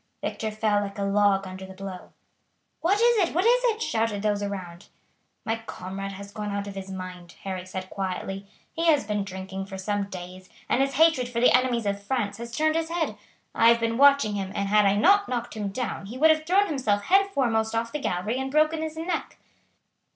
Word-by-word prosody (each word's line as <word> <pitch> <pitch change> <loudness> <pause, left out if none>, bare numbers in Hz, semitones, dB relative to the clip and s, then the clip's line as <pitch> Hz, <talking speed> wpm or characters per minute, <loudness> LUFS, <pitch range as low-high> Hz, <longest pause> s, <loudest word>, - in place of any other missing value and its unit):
Victor 220 - -2
fell 215 -1 +1
like 200 0 -5
a 200 - -2
log 200 -1 +3
under 190 0 -8
the 190 0 -10
blow. 190 -1 -8 0.7
"What 390 +5 +2
is 475 0 +4
it? 355 -6 +1
What 360 +4 +2
is - - +4
it?" 455 -1 +1
shouted 225 -7 -1
those 205 -1 +1
around. 185 -4 -6 0.6
"My 225 0 0
comrade 195 +2 -6
has 200 +1 -9
gone 210 -1 -4
out 200 0 -2
of 200 - -7
his 195 0 -7
mind," 185 -2 -8
Harry 185 -1 -5
said 185 0 -5
quietly; 195 +1 -4 0.3
"he 335 0 -1
has 300 -3 +4
been 205 -1 -1
drinking 190 0 -6
for 190 -1 -7
some 205 +1 -1
days, 185 -1 -9 0.2
and 255 - +2
his 275 0 +1
hatred 315 -5 +4
for 235 -1 -2
the 245 - +6
enemies 250 -3 +1
of 200 0 -1
France 205 -2 -2
has 235 +1 -7
turned 310 +6 +1
his 325 0 -1
head. 335 -1 -1 0.4
I 230 - +4
have 235 0 +5
been 230 0 0
watching 280 -6 +5
him, 195 -2 -3
and 200 0 -1
had 210 0 +5
I 195 - +3
not 400 - +4
knocked 240 -1 -3
him 210 -2 -3
down 215 -2 -4
he 235 +5 -7
would 315 +4 +6
have 310 0 0
thrown 390 +3 +4
himself 250 - 0
head 390 - +4
foremost 230 - 0
off 230 0 -1
the 300 - -3
gallery 215 +1 -2
and 265 0 -2
broken 310 +2 +2
his 315 0 -4
neck." 330 +1 -3
215 Hz, 215 wpm, -26 LUFS, 195-285 Hz, 0.7 s, the